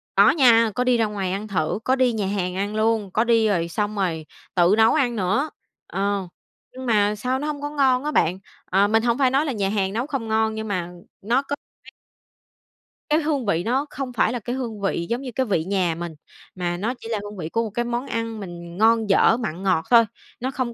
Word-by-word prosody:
Có - - +7
nha, 230 -6 +5
có 250 - +1
đi 250 -1 +3
ra 225 - +2
ngoài 195 -3 -3
ăn 205 +3 -3
thử, 180 0 -1
có 260 - +2
đi 255 -2 +2
nhà 210 -3 -1
hàng 185 -2 -2
ăn 205 +2 -2
luôn. 215 -3 +1
Có 220 - +2
đi, 230 -2 +3
rồi 170 -5 +1
xong 210 +4 -2
rồi 170 -5 -1 0.3
tự 175 +3 +4
nấu 220 0 +5
ăn 255 -6 +1
nữa, 210 +9 0 0.4
ờ. 200 -1 -1 0.5
Nhưng 260 0 -8
mà 210 -2 +2
sao 255 +5 -1
nó 295 - -3
hông 290 -1 -4
có 290 - -3
ngon 270 -3 +2
á 300 - -1
bạn. 180 - +1 0.3
Ờ, 195 +2 +3
mình 225 +1 +2
hổng 235 +1 +2
phải 265 -2 +3
nói 275 +4 +2
là 285 - -1
nhà 200 -5 -1
hàng 195 -2 -1
nấu 240 +5 -2
không 270 -7 -3
ngon, 220 0 +1
nhưng 220 0 -4
mà 180 -3 -3 0.3
nó 235 +6 +2
có 280 +1 -4 0.3
cái - - -14 1.2
Cái 305 +2 +4
hương 290 -5 -1
vị 175 -4 +1
nó 260 +7 0
không 265 -2 -5
phải 235 0 +2
là 245 - -2
cái 240 +4 -4
hương 230 -6 -5
vị 170 -3 -1
giống 240 +3 -1
như 255 -2 -6
cái 260 +2 0
vị 185 -7 0
nhà 185 -3 0
mình, 170 -1 -6 0.4
mà 175 -1 -2
nó 220 +7 -1
chỉ 225 - -9
là 220 -3 -1
hương 205 -1 -8
vị 160 -2 -5
của 230 - 0
một 220 - -4
cái 240 +4 -2
món 240 +3 -3
ăn 230 -1 -3
mình 175 -3 -8
ngon, 225 0 +3
dở, 225 +4 +5
mặn, 195 -6 -4
ngọt 185 -4 +1
thôi, 230 -1 +7 0.3
nó 260 +2 -2
không 255 -3 -3
220 Hz, 245 wpm, -23 LUFS, 195-250 Hz, 1.2 s, Có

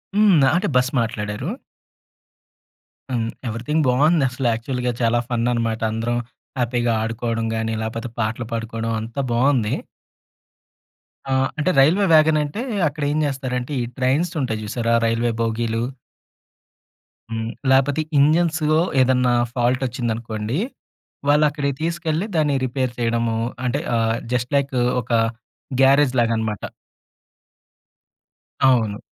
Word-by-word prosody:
హ్మ్. 205 -4 +5
ఆ! - - +5
అంటే 190 - 0
బస్ 125 +1 +3
మాట్లాడారు. 110 +3 -3 1.6
హ్మ్. 115 -3 0 0.2
ఎవ్రీథింగ్ 120 +8 -1
బావుంది 145 +5 +3
అసలు 125 0 -2
యాక్చువల్‌గా 125 +2 -2
చాలా 120 0 +3
ఫన్ 120 -1 0
అనమాట. 115 -2 -1
అందరం 115 +2 -1 0.4
హ్యాపీగా 120 -1 +1
ఆడుకోవడం 115 0 -2
గాని, 110 0 -1
లేపోతే 115 +2 -4
పాటలు 110 +2 -1
పాడుకోవడం 115 0 -3
అంతా 115 +5 -4
బావుంది. 120 -2 +2 1.6
ఆ! - - +2 0.2
అంటే 150 +5 +1
రైల్వే 170 +9 +5
వ్యాగన్ 155 0 +5
అంటే 150 +10 -4 0.3
అక్కడేం 145 0 -2
జెస్తారంటే, 130 -2 -3
ఈ - - -1
ట్రైన్స్ 135 +7 +1
ఉంటాయి 110 -5 -2
జూసారా 115 +2 -1
రైల్వే 115 +1 +1
బోగీలు? 115 0 -1 1.5
హ్మ్. 110 0 -3 0.2
లేకపోతే 135 +3 +3 0.2
ఇంజిన్స్‌లో 155 +1 +3 0.2
ఏదన్నా 125 -1 +3 0.2
ఫాల్ట్ 125 +1 +1
వచ్చిందనుకోండి 115 0 -3 0.7
వాళ్ళక్కడికి 145 -1 +2
తీసుకెళ్లి 165 +1 -1
దాన్ని 150 -3 +2
రిపేర్ 130 0 -1
చేయడము 115 -1 0 0.3
అంటే 125 +3 0 0.2
ఆహ్! 115 0 +1 0.2
జస్ట్ 125 +2 -1
లైక్ 140 -1 -1 0.3
ఒక 120 - -10 0.7
గ్యారేజ్ 135 0 +5
లాగన్నమాట. 110 -3 -1 2.0
అవును. 115 -6 +3
125 Hz, 110 wpm, -21 LUFS, 115-145 Hz, 2.0 s, హ్మ్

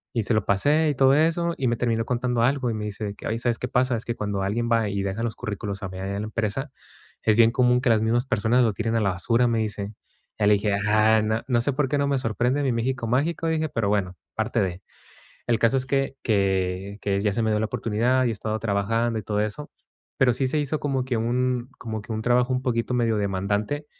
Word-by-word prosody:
Y 115 - +1
se 115 - 0
lo 110 - 0
pasé 150 +10 +2
y 145 - -1
todo 135 +1 +5
eso. 165 +2 +1
Y 130 - 0
me 120 - +2
termino 115 -2 0
contando 125 -1 0
algo 130 0 +1
me 110 - -4
dice 105 0 -5
que: - - -12
"Oye, 115 +1 -2
¿sabes 120 -1 0
qué 125 - -3
pasa? 125 0 +2
Es 115 - -4
que 120 - -3
cuando 100 -2 -3
alguien 115 +4 -1
va 115 -3 +2
y 100 0 -2
deja 100 +4 -3
los 115 - -2
currículos 100 -3 -5
a 100 - -3
mi, 95 0 -8
allá 100 +1 -3
a - - -3
la 105 - -3
empresa, 115 +5 -2 0.5
es 110 0 +3
bien 115 0 +6
común 125 0 +3
que 130 - -1
las 110 -2 +4
mismas 120 +3 +1
personas 120 +1 +2
lo 110 -3 +2
tiren 115 +1 -2
a 115 - +1
la 100 - +2
basura", 115 +7 +1
me 115 -1 +1
dice. 105 -1 -3 0.5
Ya 105 - +3
le 105 - +6
dije: 100 0 0
"Ah, 110 +1 +4
no 110 +1 0
no 120 -3 +2
sé 145 - 0
por 145 -1 0
qué 145 - +1
no 140 0 +1
me 140 -1 +1
sorprende 120 +4 0
mí 130 - +1
México 120 +1 -2
mágico", 150 +7 0
dije, 160 -1 0
pero 115 -5 -1
bueno, 95 -3 0 0.2
parte - - -1
de. 90 0 -2 0.7
El 120 -1 +3
caso 115 +4 +3
es 130 - -1
que 135 0 -1
que 95 -1 0
que 100 -1 0
ya 105 -1 +1
se 115 - 0
me 110 - +1
dio 105 - +1
la 110 - 0
oportunidad 120 +5 +1
y - - +2
he - - 0
estado 110 +1 -3
trabajando 115 +2 0
y - - -8
todo 105 +1 -1
eso. 125 +8 -4 0.5
Pero 125 -2 +4
sí 130 +3 0
se 140 - 0
hizo 145 +1 -1
como 135 -3 -1
que 130 - -1
un 125 +2 0
como 110 -3 -5
que 110 - -9
un 110 - -3
trabajo 125 +1 +2
un 125 - 0
poquito 120 -1 -1
medio 115 -3 +1
demandante 100 +8 -1
115 Hz, 255 wpm, -24 LUFS, 105-125 Hz, 0.7 s, bien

